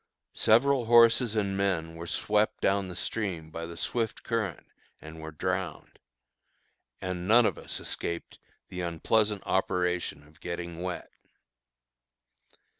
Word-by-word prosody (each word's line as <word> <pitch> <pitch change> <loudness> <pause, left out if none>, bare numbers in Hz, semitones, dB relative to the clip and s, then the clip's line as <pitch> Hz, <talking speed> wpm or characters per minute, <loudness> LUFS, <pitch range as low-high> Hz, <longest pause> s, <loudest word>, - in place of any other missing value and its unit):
Several 130 +3 +4
horses 115 0 +6
and 100 -2 0
men 90 -5 0
were 85 +1 -7
swept 105 +4 +1
down 95 0 +1
the 90 - -7
stream 90 -9 -3
by 85 +1 -5
the 85 0 -9
swift 115 +2 -2
current 110 -8 -2 0.3
and 80 +1 -10
were 80 - -6
drowned; 95 +3 -3 1.0
and 90 -1 -4
none 115 +3 +7
of - - +1
us - - -6
escaped 85 0 -5 0.3
the 90 - -5
unpleasant 100 +5 +1
operation 90 -4 0
of 75 0 -22
getting 85 -1 -5
wet. 90 -1 -4
95 Hz, 125 wpm, -29 LUFS, 85-110 Hz, 1.0 s, none